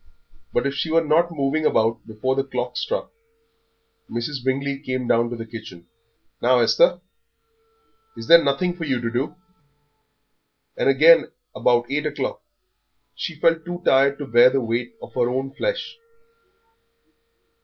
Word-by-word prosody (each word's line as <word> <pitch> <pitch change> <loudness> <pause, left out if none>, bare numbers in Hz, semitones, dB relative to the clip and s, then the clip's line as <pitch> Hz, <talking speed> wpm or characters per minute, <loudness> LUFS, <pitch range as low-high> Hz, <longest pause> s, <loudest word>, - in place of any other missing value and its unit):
But 120 - 0
if 140 - -1
she 160 - -3
were 165 +1 +3
not 165 +3 +2
moving 155 -1 -1
about 115 -5 +1
before 110 +4 -2
the 135 - 0
clock 135 - -4
struck, - - -3 1.0
Mrs. 120 +3 -4
Bingley 135 +1 -1
came 130 -3 -4
down 115 0 +2
to 120 - -5
the 115 -1 -7
kitchen. 110 -6 -10 0.6
"Now, 125 +1 +4
Esther, - - +3 1.2
is - - -7
there 170 0 +8
nothing 175 +6 0
for 175 - -6
you 135 -5 -1
to 115 -1 -3
do?" 125 +5 -2 1.4
And - - +1
again, 155 +5 +5 0.2
about 120 -1 +2
eight 150 +1 -1
o'clock, 150 - -4 0.7
she 170 - -5
felt 165 0 +2
too 175 +1 -7
tired 140 +1 +4
to 145 - -6
bear 120 +1 +6
the 135 +1 0
weight 120 - -3
of - - -11
her 120 -1 +1
own 135 +2 -3
flesh. 470 - -3
135 Hz, 150 wpm, -22 LUFS, 120-160 Hz, 1.4 s, there